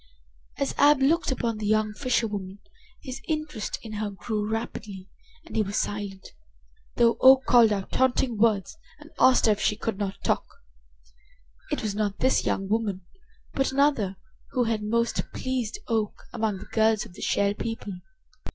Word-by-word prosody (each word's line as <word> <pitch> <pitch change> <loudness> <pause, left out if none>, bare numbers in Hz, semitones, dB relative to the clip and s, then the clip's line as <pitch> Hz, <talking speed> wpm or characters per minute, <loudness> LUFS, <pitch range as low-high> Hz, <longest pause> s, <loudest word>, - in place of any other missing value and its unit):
As 275 - -1
Ab 290 0 +6
looked 285 +3 +2
upon 230 -4 -2
the 210 - -2
young 215 0 +2
fisherwoman 210 -6 -2 0.5
his 265 -2 -6
interest 305 -8 -3
in 225 - -8
her 210 - -1
grew 210 +2 -3
rapidly 210 -4 -5 0.4
and - - -10
he 220 - +3
was 205 -1 -2
silent, 200 -2 -3 0.7
though 235 -1 +4
Oak 265 0 +7
called 235 -3 +6
out 195 -2 -2
taunting 260 -1 +1
words 220 - +1 0.2
and 300 +1 -15
asked 255 -1 +5
her 220 - +5
if 205 - -1
she 210 - +2
could 215 -1 -3
not 200 -1 -2
talk. - - +1 1.3
It - - -1
was 210 -2 -1
not 205 -1 -1
this 260 +1 +2
young 195 - -1
woman, 200 -4 -1 0.5
but 270 -1 0
another, 265 -9 +2 0.4
who 250 - +2
had 225 -2 -1
most 235 +3 0
pleased 255 - -2
Oak 220 -3 -1
among 220 -4 -1
the - - -10
girls 220 -1 +2
of - - -14
the - - -12
Shell 200 0 +1
People. 220 -2 -5
220 Hz, 165 wpm, -26 LUFS, 205-255 Hz, 1.3 s, Oak